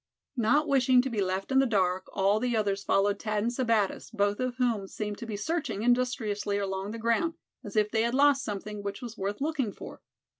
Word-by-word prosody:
Not 280 +6 +2
wishing 255 -3 +4
to 265 - -3
be 215 -3 -1
left 190 +4 -2
in 265 - +5
the 270 - +4
dark, 185 -4 +1
all 200 +2 +2
the 240 -1 0
others 200 -2 0
followed 200 +1 +1
Thad 215 -1 -1
and 235 - 0
Sebattis, 230 -5 0
both 205 -2 0
of 255 -1 -1
whom 235 -6 0
seemed 210 +1 -5
to 235 - -7
be 215 -2 -4
searching 300 -4 -2
industriously 235 -5 +1
along 195 0 -3
the 225 - -5
ground, 230 +9 +1 0.3
as 205 - -9
if 210 -1 +2
they 220 - +2
had 235 +2 0
lost 280 -1 +4
something 210 0 -5
which 200 +5 -5
was 235 -2 -7
worth 200 +3 -4
looking 280 -7 -1
for. - - -10
220 Hz, 215 wpm, -28 LUFS, 200-250 Hz, 0.3 s, in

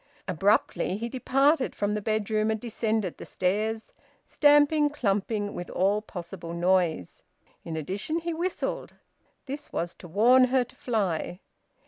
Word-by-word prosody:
Abruptly 190 +1 +1
he 230 +2 -3
departed 270 +3 +2
from 205 0 -1
the 210 - -2
bedroom 215 0 0
and 220 0 0
descended 220 -4 -2
the - - -7
stairs, 215 +4 -1 0.3
stamping, 295 0 +4
clumping, 205 -5 -1
with 175 - -6
all 200 +3 +1
possible 170 -4 -8
noise; 175 - +1 0.4
in 160 -1 -5
addition 195 - -2
he 335 0 -3
whistled. 350 +3 -3 0.5
This 285 +2 -7
was 170 0 -2
to 180 - -10
warn 240 +9 +5
her 255 0 +2
to 250 +2 -18
fly. 200 - -2
215 Hz, 135 wpm, -27 LUFS, 185-255 Hz, 0.5 s, warn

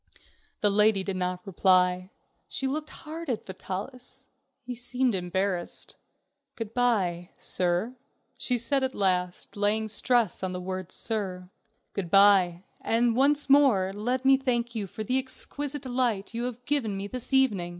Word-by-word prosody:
The 205 - +3
lady 210 -1 +3
did 190 -1 -3
not 180 0 -3
reply. 185 -1 +2 0.4
She 270 - -3
looked 300 +3 -2
hard 320 0 -8
at 235 -4 -2
Vitalis. 195 +7 -7 0.3
He 250 0 -5
seemed 245 +1 0
embarrassed. 185 0 -2 0.6
"Good 225 -1 -6
by, 195 -8 +1
sir," 180 +8 -1 0.4
she 250 - +1
said 255 +4 +1
at 260 0 -1
last, 180 -2 -1
laying 210 +2 +1
a - - -6
stress 235 -2 +1
on 185 -1 -2
the 180 - -4
word 185 0 -5
"sir." 190 -5 -3 0.4
"Good 190 -4 -3
by, 190 -2 +5 0.2
and 230 0 +2
once 285 +3 +3
more 260 -10 +4
let 245 +6 -2
me 270 0 +6
thank 240 -3 -1
you 210 -4 -3
for 215 - -6
the 255 +5 +1
exquisite 280 +2 -3
delight 245 -6 -1
you 235 +1 -2
have 245 0 -6
given 240 -9 0
me 195 - -4
this 250 +5 -4
evening." 225 -10 +2
215 Hz, 155 wpm, -27 LUFS, 185-255 Hz, 0.6 s, me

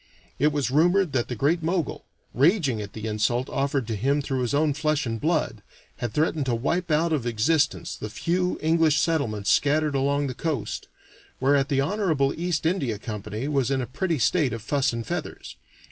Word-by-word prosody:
It 150 +3 +3
was 140 -3 -1
rumored 175 +3 +3
that 120 -3 0
the 125 - -4
Great 155 +9 +1
Mogul, 165 -1 -2 0.3
raging 140 - +2
at 100 -1 -8
the 110 0 -6
insult 110 +4 0
offered 140 -2 0
to 110 0 -3
him 135 +8 +1
through 135 -2 -2
his 125 +2 0
own 150 0 +2
flesh 155 0 0
and 115 -2 -3
blood, 150 -9 0 0.4
had 120 - -3
threatened 150 +1 0
to 120 - +1
wipe 170 +10 -1
out 160 +2 +2
of 130 -6 -1
existence 125 +7 +1
the 110 - -6
few 175 - -1
English 160 -2 +3
settlements 120 -12 0
scattered 150 +1 +2
along 140 +1 +1
the 130 - -3
coast; 140 -4 -3 0.5
whereat 140 +1 +2
the 135 -2 +2
honorable 155 -5 +1
East 170 -2 -2
India 145 - 0
Company 105 +3 -5
was 135 -4 +1
in 135 -1 +1
a 125 - -1
pretty 165 +6 -2
state 145 -1 +2
of 115 -2 -6
fuss 140 +3 +1
and 115 -1 -4
feathers. - - -5
140 Hz, 190 wpm, -25 LUFS, 120-160 Hz, 0.5 s, It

